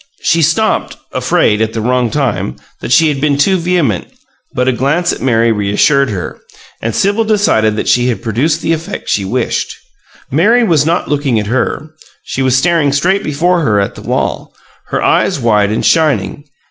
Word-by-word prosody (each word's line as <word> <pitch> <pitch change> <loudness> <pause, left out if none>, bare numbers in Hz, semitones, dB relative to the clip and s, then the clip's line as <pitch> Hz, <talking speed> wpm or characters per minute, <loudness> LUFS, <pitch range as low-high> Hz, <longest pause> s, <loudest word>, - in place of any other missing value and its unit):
She 165 - +2
stopped, 165 +8 0
afraid 105 +1 +1
at 110 0 -1
the 115 - -3
wrong 125 +1 0
time 120 - -2 0.2
that - - -6
she 160 +4 +5
had 140 -3 -2
been 145 -1 +1
too 190 +7 +3
vehement, 170 - 0 0.4
but 125 0 -1
a - - +4
glance 145 +8 0
at - - -8
Mary 115 -2 +2
reassured 110 +7 +2
her, 95 -4 -5 0.4
and 115 0 -3
Sibyl 205 +3 +1
decided 200 - +1
that - - -3
she 125 0 +2
had 120 -1 -2
produced 125 +8 -1
the 165 - +1
effect 160 0 -6
she 100 - 0
wished. 120 +5 -2 0.6
Mary 215 - +3
was 160 -8 +2
not 170 +2 0
looking 140 -5 0
at 105 - -3
her; 130 +7 -2 0.3
she 135 - -4
was 130 -1 +2
staring 160 -1 +2
straight 180 +8 +1
before 170 +5 +1
her 105 -9 +1
at 100 - -1
the - - -11
wall, - - -3 0.3
her - - -2
eyes - - +1
wide 105 -4 +2
and 110 - -1
shining. 155 -2 +1
140 Hz, 185 wpm, -13 LUFS, 115-165 Hz, 0.6 s, she